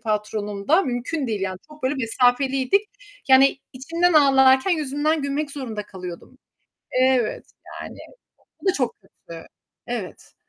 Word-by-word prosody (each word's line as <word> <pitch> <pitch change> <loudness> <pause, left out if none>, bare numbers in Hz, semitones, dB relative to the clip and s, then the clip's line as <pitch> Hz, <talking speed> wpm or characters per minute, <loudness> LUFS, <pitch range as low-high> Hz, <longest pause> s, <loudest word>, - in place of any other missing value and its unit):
patronumda, 210 - 0
mümkün 260 +4 -3
değil 215 -4 -2
yani, 190 -1 -3
çok 305 -1 -16
böyle 260 +3 0
mesafeliydik. 265 - +1 0.4
Yani, 265 +1 +6
içimden 335 +7 0
ağlarken 270 +1 +5
yüzümden 305 -1 0
gülmek 280 +1 -2
zorunda 245 -7 -5
kalıyordum. 180 +6 -10 0.6
Evet, 255 -3 +1 0.4
yani, - - -9 0.6
o - - -14
da 380 - +4
çok 255 -7 -1
kötü. 170 -3 -13 0.4
Evet. - - -6
265 Hz, 120 wpm, -23 LUFS, 225-290 Hz, 0.6 s, Yani